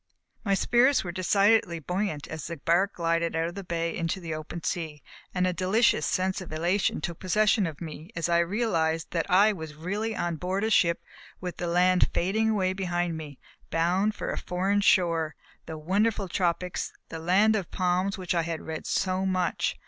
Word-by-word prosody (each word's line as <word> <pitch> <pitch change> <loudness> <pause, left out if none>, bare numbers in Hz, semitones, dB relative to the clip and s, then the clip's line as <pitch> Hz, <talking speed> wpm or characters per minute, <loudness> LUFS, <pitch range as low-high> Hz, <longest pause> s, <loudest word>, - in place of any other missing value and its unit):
My 200 -3 +2
spirits 245 +7 +3
were 175 - -4
decidedly 195 0 +3
buoyant 180 -1 -3
as 155 -1 -6
the 170 - -5
bark 175 +7 +1
glided 165 -1 0
out 165 +1 0
of - - -9
the 200 +1 -6
bay 170 -1 -2
into 170 +3 -2
the 165 -3 -5
open 155 +2 -6
sea, 160 -4 -3 0.3
and 180 -1 0
a 180 - +1
delicious 190 +7 +2
sense 190 +1 0
of 180 - -9
elation 175 +6 0
took 170 -3 -4
possession 210 +1 +2
of 155 -3 -7
me 160 0 -8
as 170 - -1
I 170 0 +3
realized 170 -4 0
that 170 +2 -1
I 200 +4 +5
was 160 -5 -8
really 205 +8 -3
on 170 -3 -2
board 185 +4 -2
a 220 - 0
ship, 170 -5 +3 0.4
with 180 -1 -5
the 175 - -3
land 180 +1 +3
fading 215 +5 +1
away 190 -4 +1
behind 175 -3 -1
me, 150 -4 -8 0.3
bound 185 +6 +1
for - - -3
a - - -3
foreign 195 +3 0
shore, 165 -5 +2 0.3
the 160 - -5
wonderful 200 +5 0
tropics, 180 0 -1 0.2
the 165 - -6
land 195 +6 +3
of 195 -5 -2
palms 185 +2 0
of - - -11
which 180 - -1
I 170 - +2
had 165 -1 -4
read 160 -1 -6
so 185 0 0
much. 185 -2 0
180 Hz, 195 wpm, -27 LUFS, 165-195 Hz, 0.4 s, I